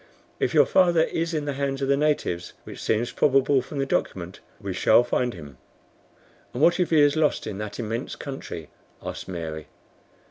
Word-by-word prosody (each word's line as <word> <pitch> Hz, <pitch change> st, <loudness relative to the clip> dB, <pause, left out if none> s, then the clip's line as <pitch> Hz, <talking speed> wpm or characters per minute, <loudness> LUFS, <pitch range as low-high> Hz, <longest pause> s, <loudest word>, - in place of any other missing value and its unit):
"If -, -, 0 dB
your -, -, +7 dB
father 175 Hz, -3 st, +4 dB
is 165 Hz, +1 st, -2 dB
in 155 Hz, -3 st, -2 dB
the 145 Hz, -, -2 dB
hands 135 Hz, 0 st, -2 dB
of -, -, 0 dB
the 140 Hz, -, +4 dB
natives, 140 Hz, -, -1 dB
which -, -, -9 dB
seems 110 Hz, +2 st, 0 dB
probable 135 Hz, -1 st, +3 dB
from 135 Hz, +3 st, -8 dB
the 135 Hz, -, 0 dB
document, 90 Hz, -8 st, -2 dB, 0.2 s
we 100 Hz, -3 st, -4 dB
shall 115 Hz, -, +5 dB
find 120 Hz, -1 st, -1 dB
him." 70 Hz, -6 st, -11 dB, 1.0 s
"And 130 Hz, -, 0 dB
what 170 Hz, +3 st, +5 dB
if 180 Hz, -, +1 dB
he 160 Hz, -, +4 dB
is 145 Hz, 0 st, +5 dB
lost 155 Hz, -1 st, +1 dB
in 105 Hz, -2 st, -5 dB
that 105 Hz, -1 st, -5 dB
immense 115 Hz, +3 st, -3 dB
country?" 135 Hz, -, -7 dB, 0.3 s
asked -, -, -6 dB
Mary. 80 Hz, -4 st, -5 dB
135 Hz, 185 wpm, -25 LUFS, 95-145 Hz, 1.0 s, your